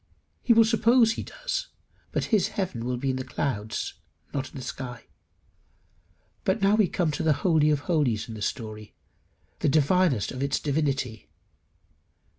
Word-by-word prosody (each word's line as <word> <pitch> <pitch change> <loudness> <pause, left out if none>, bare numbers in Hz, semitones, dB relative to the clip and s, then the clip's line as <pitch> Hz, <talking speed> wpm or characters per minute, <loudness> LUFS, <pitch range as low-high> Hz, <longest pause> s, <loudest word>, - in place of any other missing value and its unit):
He - - +2
will 225 -1 +7
suppose 230 +1 +4
he - - -3
does, - - -4 0.4
but - - 0
his 210 - +4
heaven 170 - -3
will 125 0 -1
be 135 +2 0
in 130 - -3
the 130 - -3
clouds, 110 -6 -3 0.4
not 135 -2 -2
in - - -18
the 130 - -6
sky. 125 -3 -6 1.4
But 190 +4 +1
now 195 0 +4
we 215 -3 +4
come 170 -2 0
to - - -3
the 160 -1 +3
holy 160 -4 +4
of 150 -2 +2
holies 145 - 0
of 115 - -7
the 110 - -8
story 110 -1 -5 0.6
the - - +2
divinest 155 - +3
of 130 - -6
its 140 -1 0
divinity. 140 -6 -1
145 Hz, 165 wpm, -26 LUFS, 125-190 Hz, 1.4 s, will